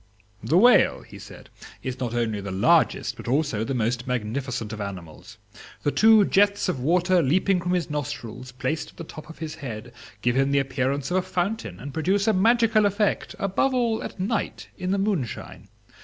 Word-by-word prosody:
"The 165 Hz, -, +2 dB
whale," 245 Hz, +6 st, +5 dB
he -, -, -13 dB
said, -, -, -13 dB, 0.3 s
"is 130 Hz, -1 st, -4 dB
not 120 Hz, -3 st, -3 dB
only 110 Hz, -3 st, -1 dB
the 100 Hz, -, -6 dB
largest, 95 Hz, +1 st, +2 dB
but -, -, -9 dB
also 130 Hz, -4 st, 0 dB
the 135 Hz, +3 st, -2 dB
most 120 Hz, +1 st, -1 dB
magnificent 120 Hz, -1 st, -3 dB
of 110 Hz, -, -6 dB
animals; 95 Hz, +1 st, -8 dB, 0.5 s
the 145 Hz, -, +1 dB
two 220 Hz, +1 st, +6 dB
jets 200 Hz, +1 st, +2 dB
of 180 Hz, -8 st, -1 dB
water 180 Hz, +6 st, +3 dB
leaping 180 Hz, +6 st, +2 dB
from 180 Hz, +1 st, -1 dB
his 175 Hz, -3 st, 0 dB
nostrils, 130 Hz, -4 st, -5 dB
placed 130 Hz, +5 st, -3 dB
at -, -, -20 dB
the -, -, -6 dB
top 155 Hz, -1 st, -11 dB
of 160 Hz, -, -11 dB
his 160 Hz, -1 st, -5 dB
head, 125 Hz, -6 st, -7 dB, 0.3 s
give 120 Hz, 0 st, +2 dB
him 135 Hz, +1 st, +2 dB
the 140 Hz, -, +2 dB
appearance 135 Hz, +1 st, -1 dB
of 185 Hz, -, +2 dB
a -, -, +3 dB
fountain, 195 Hz, +5 st, -3 dB
and 140 Hz, +1 st, -8 dB
produce 190 Hz, +6 st, +1 dB
a 220 Hz, -, +4 dB
magical 225 Hz, +1 st, +4 dB
effect, 205 Hz, 0 st, -1 dB
above 200 Hz, +7 st, 0 dB
all 235 Hz, -3 st, +1 dB
at -, -, -7 dB
night, 210 Hz, +4 st, -2 dB
in 185 Hz, -1 st, -4 dB
the 195 Hz, -, +1 dB
moonshine. 195 Hz, -, -3 dB
150 Hz, 190 wpm, -25 LUFS, 125-195 Hz, 0.5 s, two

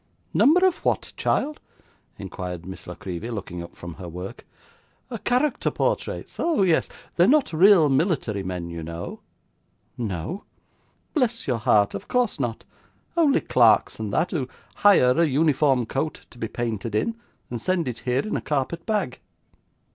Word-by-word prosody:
'Number 360 Hz, +6 st, +5 dB
of 370 Hz, -2 st, +2 dB
what, -, -, -1 dB
child?' 300 Hz, +2 st, 0 dB, 0.6 s
inquired 90 Hz, -2 st, -6 dB
Miss 95 Hz, +1 st, -9 dB
La -, -, -6 dB
Creevy, 95 Hz, +5 st, -6 dB
looking 95 Hz, -6 st, -5 dB
up 85 Hz, -, -10 dB
from 85 Hz, -1 st, -8 dB
her 90 Hz, 0 st, -8 dB
work. 90 Hz, +3 st, -8 dB, 0.8 s
'Character 255 Hz, +4 st, +1 dB
portraits, -, -, -2 dB
oh 330 Hz, -12 st, +2 dB
yes 170 Hz, -4 st, +2 dB, 0.3 s
they're 175 Hz, +2 st, +5 dB
not 285 Hz, -, +3 dB
real 180 Hz, -1 st, +6 dB
military 135 Hz, -, +1 dB
men, 90 Hz, -2 st, -5 dB
you 85 Hz, -1 st, -6 dB
know.' 85 Hz, +1 st, -6 dB, 0.8 s
'No!' 115 Hz, -, -4 dB, 0.7 s
'Bless 245 Hz, -6 st, +1 dB
your 125 Hz, -4 st, 0 dB
heart, 105 Hz, -3 st, +3 dB
of 100 Hz, -, -6 dB
course 245 Hz, -9 st, +1 dB
not; 120 Hz, -4 st, -3 dB, 0.5 s
only 315 Hz, -5 st, +4 dB
clerks 110 Hz, -5 st, +4 dB
and 110 Hz, -2 st, -3 dB
that, 175 Hz, -, +1 dB
who 140 Hz, -7 st, -1 dB, 0.3 s
hire 165 Hz, -10 st, +5 dB
a -, -, +5 dB
uniform 140 Hz, -3 st, +2 dB
coat 135 Hz, +7 st, -3 dB
to 120 Hz, -, -15 dB
be 115 Hz, -, -2 dB
painted 115 Hz, -2 st, -3 dB
in, 225 Hz, -, 0 dB, 0.4 s
and 120 Hz, -2 st, -4 dB
send 180 Hz, -1 st, 0 dB
it 120 Hz, -2 st, -4 dB
here 125 Hz, -, 0 dB
in 215 Hz, -, -2 dB
a -, -, -1 dB
carpet 150 Hz, +5 st, -2 dB
bag. 210 Hz, -, -1 dB
130 Hz, 155 wpm, -24 LUFS, -, 0.8 s, real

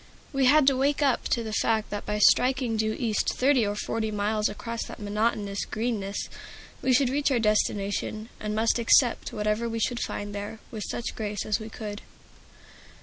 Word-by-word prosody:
We 270 Hz, -1 st, +2 dB
had 290 Hz, +2 st, +6 dB
to 270 Hz, 0 st, +5 dB
wake 280 Hz, +3 st, +1 dB
up 270 Hz, -3 st, +2 dB
to 235 Hz, -, 0 dB
the 220 Hz, -1 st, -5 dB
fact 220 Hz, 0 st, +1 dB
that 205 Hz, 0 st, -5 dB
by 210 Hz, -, -1 dB
striking 250 Hz, +2 st, +4 dB
due 220 Hz, 0 st, 0 dB
east 225 Hz, -5 st, 0 dB
thirty 255 Hz, -4 st, +3 dB
or 205 Hz, -, -2 dB
forty 220 Hz, +1 st, -2 dB
miles 210 Hz, +1 st, 0 dB
across 230 Hz, +2 st, -5 dB
that -, -, -9 dB
monotonous 205 Hz, -1 st, -1 dB
Greenness, 215 Hz, -3 st, -3 dB, 0.5 s
we 260 Hz, -, +1 dB
should 255 Hz, 0 st, +3 dB
reach 285 Hz, +1 st, +1 dB
our 265 Hz, -, +2 dB
destination, 215 Hz, 0 st, 0 dB
and 210 Hz, 0 st, -3 dB
must 225 Hz, +2 st, +2 dB
accept 235 Hz, +1 st, +3 dB
whatever 215 Hz, +2 st, -1 dB
we 230 Hz, -, -3 dB
should 240 Hz, +2 st, 0 dB
find 205 Hz, 0 st, -4 dB
there, 205 Hz, +2 st, -5 dB
with 215 Hz, -3 st, -5 dB
such 240 Hz, -, -4 dB
grace 210 Hz, -2 st, -3 dB
as 215 Hz, +1 st, 0 dB
we 220 Hz, 0 st, -7 dB
could. 210 Hz, -2 st, -6 dB
220 Hz, 185 wpm, -27 LUFS, 210-245 Hz, 0.5 s, had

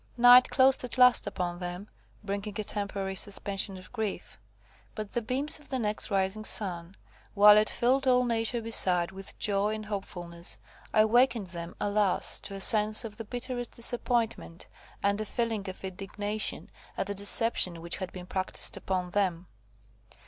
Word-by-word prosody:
Night 245 Hz, +1 st, +7 dB
closed 265 Hz, -1 st, +3 dB
at 250 Hz, +1 st, -5 dB
last 250 Hz, -1 st, +5 dB
upon 175 Hz, -1 st, -4 dB
them, 180 Hz, +2 st, -6 dB, 0.4 s
bringing 200 Hz, +1 st, -5 dB
a -, -, -1 dB
temporary 200 Hz, -2 st, -4 dB
suspension 195 Hz, 0 st, -3 dB
of 185 Hz, +4 st, -14 dB
grief; 220 Hz, -4 st, -5 dB, 0.6 s
but 215 Hz, -2 st, -6 dB
the 240 Hz, -, -2 dB
beams 270 Hz, +7 st, +1 dB
of 295 Hz, -, -18 dB
the 265 Hz, -, -1 dB
next 210 Hz, -3 st, -1 dB
rising 195 Hz, +1 st, 0 dB
sun, 180 Hz, -4 st, 0 dB, 0.4 s
while 210 Hz, +1 st, +8 dB
it 215 Hz, 0 st, +3 dB
filled 265 Hz, +3 st, +1 dB
all 250 Hz, -1 st, +4 dB
nature 230 Hz, 0 st, -1 dB
beside 180 Hz, -6 st, +2 dB
with 195 Hz, 0 st, -10 dB
joy 205 Hz, +1 st, +1 dB
and 215 Hz, 0 st, -7 dB
hopefulness, 175 Hz, -4 st, -5 dB, 0.3 s
awakened 230 Hz, +1 st, +3 dB
them, 170 Hz, -1 st, -8 dB
alas! 205 Hz, -2 st, 0 dB
to 200 Hz, -, -8 dB
a -, -, -7 dB
sense 215 Hz, +2 st, +3 dB
of 210 Hz, -2 st, -9 dB
the 225 Hz, -, -6 dB
bitterest 245 Hz, +1 st, -5 dB
disappointment, 235 Hz, -6 st, -2 dB, 0.4 s
and 200 Hz, +1 st, +1 dB
a -, -, -3 dB
feeling 220 Hz, -3 st, -2 dB
of 185 Hz, -, -10 dB
indignation 205 Hz, +3 st, -3 dB, 0.3 s
at -, -, -1 dB
the 205 Hz, -, -4 dB
deception 200 Hz, -3 st, +4 dB
which 170 Hz, +1 st, -2 dB
had 185 Hz, -2 st, -6 dB
been 180 Hz, -1 st, -9 dB
practised 190 Hz, +1 st, 0 dB
upon 180 Hz, -2 st, -3 dB
them. 185 Hz, -3 st, -1 dB
205 Hz, 160 wpm, -28 LUFS, 190-230 Hz, 0.6 s, while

